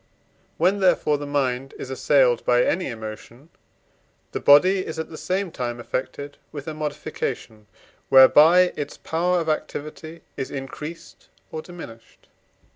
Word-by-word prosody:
When, 185 +5 +2
therefore, 155 -6 +2
the 145 - -6
mind 135 -2 -2
is 130 - -7
assailed 130 -2 +3
by 125 0 +3
any 180 +1 0
emotion, 115 +4 -9 0.8
the - - -3
body 185 +7 +5
is 160 - -7
at 160 0 -5
the - - -8
same 185 +1 -2
time 120 -3 -4
affected 130 +4 -5
with 145 -1 -8
a 160 - -4
modification 145 -7 -5 0.4
whereby 160 +7 +7
its 145 -1 -5
power 175 +2 0
of 165 - -4
activity 155 +1 -4
is 135 - -4
increased 150 +4 -8 0.2
or 160 - -5
diminished. 155 -11 -13
145 Hz, 135 wpm, -23 LUFS, 130-165 Hz, 0.8 s, whereby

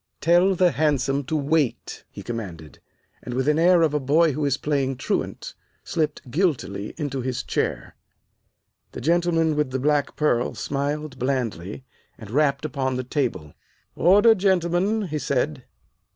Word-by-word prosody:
"Tell 175 +3 +4
the 180 -1 +3
hansom 140 -3 0
to 155 - -2
wait," 150 -2 -1
he - - -10
commanded, 90 - -7 0.4
and, 125 - -6
with 130 +2 -1
an 150 +1 +3
air 175 0 +5
of 155 -2 +2
a 150 - +1
boy 155 +4 +3
who 150 +2 -3
is 140 -1 +1
playing 135 -3 -1
truant, - - -3 0.3
slipped 155 -5 -3
guiltily 130 - -1
into 140 -4 -3
his 125 -1 -3
chair. - - -3 1.0
The - - -7
gentleman 165 +1 +2
with 150 -2 0
the 130 - -2
black 145 +1 0
pearl 125 -6 +1
smiled 145 0 -3
blandly, 120 -4 -3 0.3
and 110 -2 -11
rapped 140 +1 +1
upon 130 -2 -2
the 130 - -2
table. 120 - -2 0.4
"Order, 205 +6 +6
gentlemen," 190 +1 +1
he 155 -5 -3
said. 140 0 -1
145 Hz, 150 wpm, -24 LUFS, 130-165 Hz, 1.0 s, Order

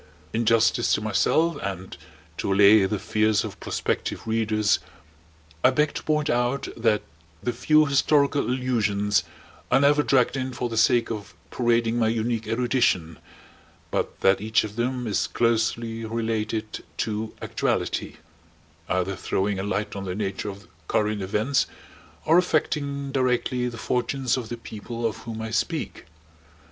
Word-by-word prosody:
In 115 0 0
justice 115 +1 +3
to - - -3
myself, 145 - +1
and 95 -1 -5 0.4
to - - -2
allay 100 +1 +6
the 105 +2 -1
fears 110 +1 +1
of - - -7
prospective - - -2
readers, 110 -2 +1 0.8
I - - +7
beg 150 +3 +1
to - - -4
point 150 -1 +1
out 125 +2 0
that 110 -2 +1 0.4
the 120 - -1
few 155 +6 +4
historical 140 0 +3
allusions 110 -5 +1 0.5
are 130 - +4
never 145 +1 +4
dragged 130 -3 +2
in 130 -1 -3
for 120 0 -3
the 115 - -4
sake 115 +1 +3
of 100 -6 -6 0.2
parading 120 -1 +1
my 115 - +3
unique 115 0 -1
erudition, 115 - +1 0.7
but - - -2
that 95 0 +4
each 110 +1 +2
of 105 -1 -6
them 125 +1 -1
is 105 -3 0
closely 115 0 0
related 110 -1 -3
to 110 0 -3
actuality; - - -2 0.7
either 95 +1 0
throwing 95 +1 -1
a - - -2
light 100 +1 -2
on 100 -1 -5
the 90 -1 -3
nature 100 0 -3
of 100 0 -9 0.2
current 105 -1 0
events 105 +8 +1 0.6
or 165 +3 +6
affecting 140 -4 -1
directly 125 -1 0
the 120 - -9
fortunes 125 +2 0
of 120 -4 -5
the 120 - -4
people 115 +1 -6
of 110 -3 -1
whom 110 -1 -6
I 110 - -5
speak. - - -2
115 Hz, 150 wpm, -25 LUFS, 105-125 Hz, 0.8 s, I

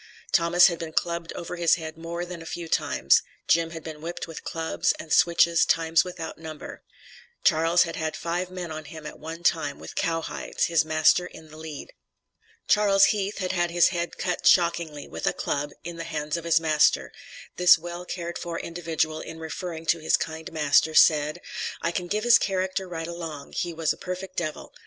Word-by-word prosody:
Thomas 175 0 +5
had 170 -3 +2
been 160 -1 -6
clubbed 170 0 -1
over 175 +1 -6
his 170 -1 +4
head 160 -2 -7
more 165 +1 -5
times 175 - -8
than 170 -2 -7
a - - -10
few. 170 -1 -5 0.8
Jim 165 0 +3
had 165 -1 -8
been 155 -2 -8
whipped 170 +2 -5
with 165 - -9
clubs 165 -1 -1
and 160 - -4
switches 170 -1 +4
times 165 0 +3
without 175 -3 -7
number. 160 -2 -9 0.6
Charles 165 +2 +4
had 165 - -5
had 160 -1 -2
five 175 +2 -3
men 180 -2 -6
on 155 -1 -6
him 155 +1 -10
at - - -8
one 165 +2 -8
time, 145 -5 +1
with - - -10
cowhides, 165 -1 -2
his 165 -1 +2
master 155 +3 +3
in 160 -1 -14
the 155 - -12
lead. 155 -2 -8 0.7
Charles 200 -2 +5
Heath 205 0 -3
had 185 -2 -2
had 175 -2 0
his 175 0 +4
head 170 -1 -3
cut 180 -1 -1
shockingly, 170 -4 +2
with - - -5
a - - +2
club, 145 +1 -2
in 170 +1 -7
the 165 - -4
hands 150 -2 -3
of 170 -1 -5
his 165 -1 +4
master; 155 -2 +2 0.5
this 180 -1 +7
well 175 +1 -7
cared 175 -1 -5
for 170 -1 -4
individual 160 -2 -2
in 160 - -8
referring 160 0 -6
to 165 +1 +2
his 155 - +2
kind 160 0 -5
master, 155 0 +3
said: 150 +1 +5 0.4
"I 170 - +1
can 175 0 -3
give 210 +4 -1
his 240 -1 +7
character 190 0 -1
right 165 -2 -5
along, 165 -4 -7
he 175 - -2
was 160 -2 0
a - - -15
perfect 185 +1 -6
devil. 155 -3 -4
165 Hz, 195 wpm, -26 LUFS, 160-175 Hz, 0.8 s, this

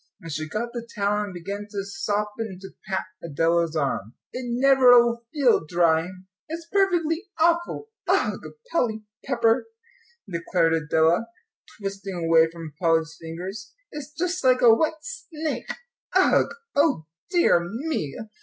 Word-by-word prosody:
And 165 -4 -9
she 155 +1 -4
got 235 +6 -3
the 235 -1 -6
towel 210 0 +1
and 200 - -8
began 200 +4 -6
to 200 -1 -4
sop 210 -2 -2
and 210 -5 -4
to 195 - -8 0.2
pat 190 0 0 0.2
Adela's 165 +1 +1
arm. 135 -7 -2 0.2
"It 255 0 -4
never'll 245 -2 +5
feel 275 - +3
dry, 165 0 +2 0.4
it's 330 +1 -6
perfectly 355 -3 +1
awful 340 +6 +1 0.2
ugh - - +1 0.3
Polly 220 -8 0 0.2
Pepper," 235 - +2 0.6
declared 170 -2 +1
Adela, 160 +6 +2 0.5
twisting 195 -1 -5
away 165 -1 +4
from 165 -2 -9
Polly's 165 -1 +2
fingers; 180 +6 -7 0.2
"it's 295 -1 -7
just 360 +2 -2
like 255 -1 +4
a 235 -2 +9
wet 315 +6 +1
snake 345 -11 -5 0.4
ugh - - +4 0.2
O 285 - +2 0.2
dear 350 - +4
me! 225 - -3
210 Hz, 135 wpm, -25 LUFS, 170-275 Hz, 0.6 s, a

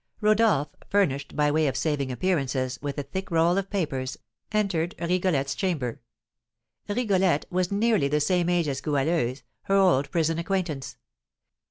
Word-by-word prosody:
Rodolph, 215 -8 +3 0.2
furnished, 140 -9 0
by 150 -1 +2
way 155 0 +2
of 135 - -1
saving 145 -4 -1
appearances, 130 -5 -1
with 145 0 -4
a 145 - -2
thick 190 +8 -5
roll 165 +1 +3
of 195 0 -5
papers, 135 -9 -2 0.3
entered 190 -5 0
Rigolette's 170 -6 0
chamber. 150 - -2 0.9
Rigolette 195 -8 +1
was 180 0 0
nearly 210 -6 +2
the 150 +2 +1
same 175 +3 +1
age 175 -3 +2
as 135 -2 -2
Goualeuse, 145 -3 0 0.2
her 195 - +2
old 180 -8 +4
prison 165 -1 0
acquaintance. 165 -9 -3
165 Hz, 145 wpm, -26 LUFS, 140-190 Hz, 0.9 s, old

